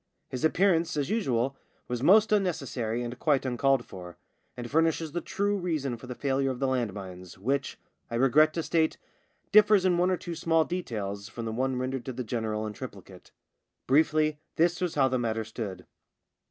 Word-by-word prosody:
His 130 - -5
appear 185 +4 +4
ance, 165 -1 -1
as 145 +5 -1
usual, 135 - 0 0.3
was 120 -1 -3
most 210 +9 +5
unnecessary 135 - 0
and 120 +1 -6
quite 145 -4 +2
uncalled 130 0 +2
for, 90 -2 -10 0.4
and 120 -1 -5
furnishes 160 +2 +1
the 175 - -3
true 205 +1 -1
reason 155 -8 -2
for 120 +2 -12
the 125 - -6
failure 135 +1 0
of 130 - -3
the 135 - -1
land 125 -5 0
mines, 90 -2 -9
which, 135 +8 -1 0.3
I 115 - -4
regret 135 +5 +5
to 165 - -1
state, 160 -1 +1 0.5
differs 210 -2 +6
in 175 -2 +3
one 180 +1 +3
or 185 - +1
two 175 0 -6
small 165 -1 +2
details 105 - -4
from 115 +1 -6
the 110 - -3
one 130 +3 -1
rendered 130 0 -3
to 130 - -4
the 125 - -4
general 110 -2 -2
in 105 - -5
triplicate. - - -10 0.6
Briefly, 155 +2 +3 0.2
this 170 +2 +2
was 180 -3 -1
how 135 -2 +4
the 130 -1 0
matter 110 -2 -1
stood. 110 -3 -6
135 Hz, 190 wpm, -28 LUFS, 120-165 Hz, 0.6 s, differs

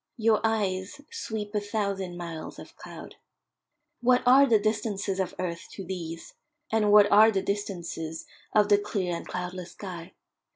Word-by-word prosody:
Your 220 -1 +3
eyes 205 +1 -1
sweep 220 - -5
a 210 - +1
thousand 200 -4 -3
miles 170 -2 -7
of - - -12
cloud. - - -11 0.8
What 250 +1 +4
are 270 +3 +7
the 230 -3 +5
distances 205 -2 -1
of 190 -2 -2
earth 170 -2 -4
to 195 - -7
these, 165 -2 -6 0.4
and 215 -2 +3
what 205 -1 +7
are 215 +2 +8
the 195 -3 0
distances 175 -6 -4 0.3
of 210 -1 +3
the 205 -1 +6
clear 200 -4 -2
and - - -7
cloudless 180 0 -5
sky? 180 -3 -8
200 Hz, 155 wpm, -27 LUFS, 180-215 Hz, 0.8 s, are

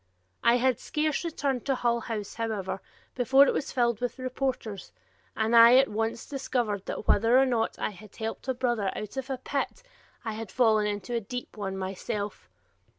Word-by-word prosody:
I 235 - +6
had 255 -1 +2
scarce 305 0 -1
returned 280 -7 -1
to 270 - +2
Hull 235 -1 +1
House, 220 -3 -5
however, 210 -4 -3 0.3
before 265 +3 +5
it - - +2
was 285 - -2
filled 235 -3 +1
with 245 +1 -2
reporters, 255 -6 -3 0.4
and 220 +1 +1
I 235 +2 +9
at 270 +1 +5
once 225 +2 -2
discovered 240 -7 -2
that - - -5
whether 230 +4 +5
or 270 - +6
not 235 -3 0
I - - -2
had 205 +1 -14
helped 225 +3 -5
a 260 - 0
brother 240 -6 0
out 215 +3 -6
of 265 0 -4
a 265 - -2
pit, 285 - -3 0.4
I 225 - -1
had 220 -1 -6
fallen 220 -4 +3
into 210 +3 -4
a 235 - 0
deep 245 +4 -6
one 195 -2 -4
myself. 200 +2 -4
235 Hz, 185 wpm, -28 LUFS, 215-255 Hz, 0.4 s, I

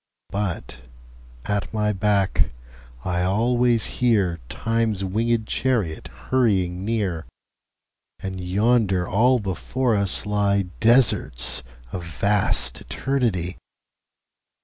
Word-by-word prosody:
But 95 -10 -4 0.7
at 100 0 -2
my 105 -1 +1
back 100 -1 +1 0.6
I 90 -1 -1
alwaies 115 +5 +1
hearTimes 105 - 0
winged 110 +4 0
Charriot 110 -11 -1
hurrying 95 -8 0
near:And 95 -1 -6
yonder 100 -1 +2
all 125 +6 +3
before 110 +4 -1
us 100 -2 0
lyeDesarts 100 - +2 0.3
of 90 - -5
vast 100 +5 +2
Eternity. 100 - -1
100 Hz, 80 wpm, -23 LUFS, 90-115 Hz, 0.7 s, all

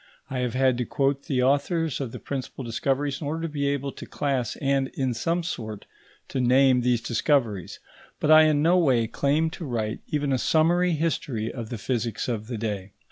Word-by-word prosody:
I 130 - -2
have 125 -1 -1
had 130 -1 +2
to 125 - 0
quote 140 +2 0
the 130 -3 +1
authors 145 +3 +1
of 130 -4 -4
the - - -7
principal 135 -1 -5
discoveries 135 +4 -1
in 145 - -3
order 160 +3 -3
to - - 0
be 140 -1 0
able 140 -1 -1
to - - -10
class 135 -4 -1
and, 135 -1 +1
in 130 -2 0
some 165 +9 -1
sort, 110 - -5 0.4
to 130 - -1
name 130 +1 +4
these 120 -1 +1
discoveries; 115 - 0 0.4
but 150 - +2
I 155 0 +9
in 150 -1 +3
no 175 +3 +5
way 130 -9 +3
claim 145 +7 +1
to 170 - -7
write 110 -4 -2
even 145 -3 0
a 130 - +1
summary 175 +4 +3
history 140 -8 -1
of 115 -3 -6
the 120 - -4
physics 115 0 -2
of 110 -3 -3
the 120 -2 -4
day. 105 -3 -4
135 Hz, 200 wpm, -25 LUFS, 120-150 Hz, 0.4 s, I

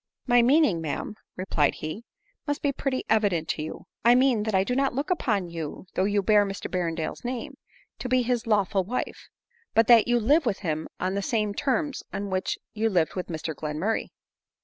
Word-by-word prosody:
" - - -64
My 245 - +8
meaning, 245 - +4
raa'am," 160 +5 -3 0.2
replied 165 -6 +1
he, 155 +10 -6 0.2
" - - -42
must 290 +1 -2
be 285 - +2
pretty 270 -1 -2
evident 200 -8 +2
to - - -1
you; 155 - -7 0.2
I 235 +2 +6
mean 255 -3 +4
that 215 -3 0
I 190 - +4
do 250 +5 -1
not 270 -1 +1
look 290 +7 -2
upon 210 - 0
you, 165 +1 -6
% - - -38
though 185 - +1
you 205 0 +1
bear 210 0 +5
Mr 195 -1 -5
Berrendale's 170 0 -2
name, 245 -1 -4 0.4
to 250 - -4
be 255 0 +3
his 240 -1 -1
lawful 200 -3 +2
wife; 240 +7 -4 0.5
but 225 - +6
that 230 0 +6
you 240 0 +3
lite 290 +9 +4
with 220 -6 -1
him 155 -4 -2
on 185 +1 -1
the 200 - -1
same 210 0 0
terms 285 +4 -1
on 200 0 -4
which 185 0 -1 0.2
you 225 +1 +1
lived 175 -6 +1
with 185 - -4
Mr 160 -1 -4
Glenmurray." 155 +9 -2
210 Hz, 210 wpm, -26 LUFS, 185-245 Hz, 0.5 s, My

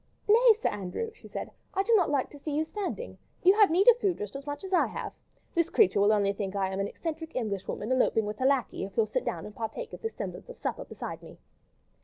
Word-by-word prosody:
"Nay, 460 +2 +7
Sir - - +1
Andrew," 210 - -4
she - - -15
said, - - -6 0.2
"I 390 - +2
do 465 - +2
not 375 -7 +4
like 280 -3 0
to 290 - -12
see 290 0 -3
you 310 - +1
standing. 420 +7 -5 0.2
You 370 +2 +7
have 420 -1 +6
need 365 +6 +3
of 485 0 +8
food 390 -6 +1
just 205 +2 -6
as 275 +1 -7
much 290 +5 -5
as 385 0 -5
I 360 - +4
have. - - -5 0.4
This 335 -1 +2
creature 395 - +4
will 205 +1 +5
only 200 -2 +2
think 195 -1 -4
that 200 - -2
I 190 - +1
am 190 0 -3
an 195 - 0
eccentric 320 +5 -6
Englishwoman 210 -1 -3
eloping 250 -4 +3
with 210 +1 -5
her 260 - +3
lacquey, 270 -8 +1
if 195 +2 -8
you'll 225 - +4
sit 215 - -2
down 165 - -3
and 210 - -9
partake 335 - -5
of - - -8
this 450 - -4
semblance - - -6
of - - -9
supper - - -3
beside - - -7
me." - - -13
290 Hz, 260 wpm, -29 LUFS, -, 0.4 s, of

